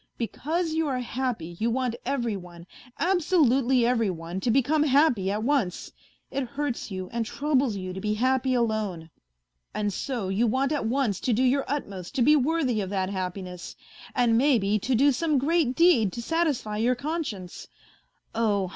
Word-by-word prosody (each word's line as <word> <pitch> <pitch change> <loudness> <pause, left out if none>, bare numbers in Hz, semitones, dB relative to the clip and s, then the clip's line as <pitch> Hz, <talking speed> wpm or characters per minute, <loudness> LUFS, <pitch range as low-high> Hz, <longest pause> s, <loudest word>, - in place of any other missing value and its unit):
Because 315 +8 -2
you 320 -1 0
are 265 -3 -1
happy, 245 -9 -3
you 230 - +1
want 250 0 -1
every 240 -5 -1
one, 175 -2 -10 0.3
absolutely 280 -8 +3
every 230 -3 +2
one, 170 +1 -5
to 235 - -1
become 275 +5 +3
happy 275 -9 +3
at 210 +2 -1
once. 240 -9 0 0.4
It 275 0 -1
hurts 280 -3 -3
you 185 -2 -5
and 235 -1 0
troubles 275 -1 0
you 185 -1 -5
to 190 - -6
be 210 0 -1
happy 255 +2 +1
alone. 215 -8 -1 0.6
And 205 -1 -1
so 240 -5 -3
you 210 +5 +1
want 265 +5 +1
at 290 -7 -1
once 235 -5 0
to 250 - 0
do 245 +4 +2
your 265 +2 +2
utmost 200 -9 -5
to 255 - +3
be 300 +5 +6
worthy 275 -5 +1
of 190 - -4
that 190 -1 -1
happiness, 180 -1 -5 0.4
and 235 -2 +3
maybe 220 -7 +2
to 255 +5 0
do 280 +5 +5
some 305 +2 +1
great 285 -1 +1
deed 320 - +4
to 235 - -5
satisfy 295 -9 -1
your 240 +3 +2
conscience. 260 - -5 0.7
Oh 205 -5 +1
240 Hz, 175 wpm, -26 LUFS, 205-280 Hz, 0.7 s, be